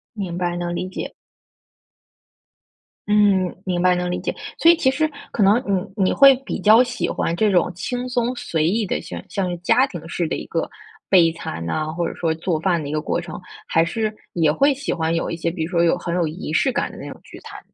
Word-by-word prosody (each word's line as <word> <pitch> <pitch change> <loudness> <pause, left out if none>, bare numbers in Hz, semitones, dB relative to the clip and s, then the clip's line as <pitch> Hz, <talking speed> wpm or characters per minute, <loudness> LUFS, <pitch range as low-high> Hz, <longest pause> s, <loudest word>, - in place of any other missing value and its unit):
明 180 -4 -4
白， 175 -1 -1
能 175 0 -3
理 185 - -3
解。 - - -6 1.9
嗯， 200 -3 +3
明 175 -1 -1
白， 180 0 +4
能 180 0 -2
理 180 - -1
解。 - - -2 0.2
所 335 - +7
以 340 - +2
其 265 - +3
实 310 +3 0 0.2
可 210 - +1
能 210 +6 +4 0.4
你 195 - +2
你 - - +2
会 275 -1 +8
比 - - -3
较 220 +3 +7
喜 245 -1 -1
欢 165 - -1
这 210 +3 +2
种 180 -3 +3
轻 245 +7 -4
松 245 0 0
随 160 -9 -1
意 210 +6 +1
的、 - - -2
像 - - -7
像 180 -3 -3
家 250 +8 +4
庭 175 - -9
式 170 +1 -2
的 160 - -2
一 - - -7
个 165 - -2 0.4
备 175 -4 +6
餐 85 - -6
呐， 155 - -1
或 170 +1 -2
者 - - -6
说 165 -2 0
做 165 0 -1
饭 175 -3 +1
的 145 - -6
一 - - -5
个 155 - -1
过 160 - -1
程？ 175 -1 -7 0.3
还 165 - +3
是 215 +5 -2 0.2
也 160 -3 +2
会 275 - +3
喜 280 +1 -3
欢 165 -1 -1
有 165 - -1
一 - - -3
些， 165 0 -2
比 165 -2 -4
如 160 - -4
说 170 -2 +2
有 170 +1 +3
很 175 0 -3
有 175 - +1
仪 155 0 -5
式 265 - +2
感 - - -1
的 - - -12
那 - - -8
种 - - -12
聚 - - -13
餐？ - - -10
180 Hz, 255 characters per minute, -21 LUFS, 165-215 Hz, 1.9 s, 会